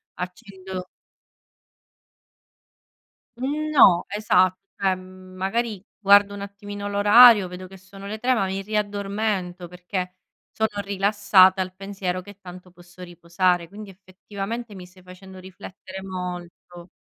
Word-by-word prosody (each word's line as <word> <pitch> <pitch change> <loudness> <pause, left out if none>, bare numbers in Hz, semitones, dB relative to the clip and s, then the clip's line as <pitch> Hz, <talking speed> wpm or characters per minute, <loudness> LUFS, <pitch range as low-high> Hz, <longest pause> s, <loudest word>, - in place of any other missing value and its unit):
accendo 185 -1 -8 2.5
Mhmm, 295 +5 -3
no, 185 - +6
esa 200 -3 +3 0.3
cioè, 190 -1 +1
mhmm, 185 0 -14
magari 205 +2 -3
guardo 200 0 +5
un 200 - -8
attimino 205 0 -7
l'orario, 205 0 +7
vedo 180 +1 -9
che 190 +1 -14
sono 195 +1 -13
le 215 +2 -5
3, 250 +3 +1
ma 195 -5 0
mi 190 +1 -4
riaddormento 200 -3 -3
perché 180 +1 -5 0.4
sono 220 -2 -2
rilassata 200 -1 +4
al 185 0 -3
pensiero 190 -2 -4
che 205 +1 -14
tanto 180 -1 -12
posso 175 +1 -16
riposare, 175 0 -1
quindi 205 +3 -11
effettivamente 200 +4 -8
mi 180 -1 -10
stai 185 +1 -20
facendo 185 +1 -13
riflettere 185 0 -11
molto. 180 -1 -8
190 Hz, 125 wpm, -23 LUFS, 185-205 Hz, 2.5 s, l'orario